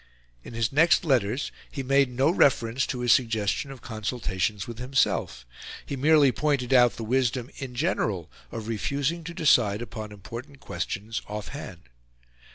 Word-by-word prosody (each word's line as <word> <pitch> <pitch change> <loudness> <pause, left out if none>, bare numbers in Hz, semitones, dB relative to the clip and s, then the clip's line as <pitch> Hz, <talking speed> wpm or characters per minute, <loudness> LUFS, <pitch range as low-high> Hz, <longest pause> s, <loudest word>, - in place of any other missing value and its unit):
In 115 - -10
his 115 -1 0
next 160 +5 +4
letters 130 -2 +1 0.2
he 135 - -5
made 135 0 +3
no 130 +5 +2
reference 130 -7 +2
to 125 - -3
his 120 -1 +3
suggestion 115 +1 0
of 135 -3 -11
consultations 105 -3 -2
with 120 -1 -8
himself; 125 - 0 0.4
he 140 - -4
merely 145 0 +5
pointed 135 -3 0
out 120 -2 +6
the 115 - -6
wisdom, 125 +1 0
in 130 -2 -7
general, 110 - -1 0.2
of 110 -2 -6
refusing 140 +9 -1
to 170 - -6
decide 120 - +3
upon 110 -2 -7
important 120 +7 -9
questions 105 +3 -4
off 105 0 -6
hand. 95 - -8
125 Hz, 155 wpm, -26 LUFS, 110-140 Hz, 0.4 s, out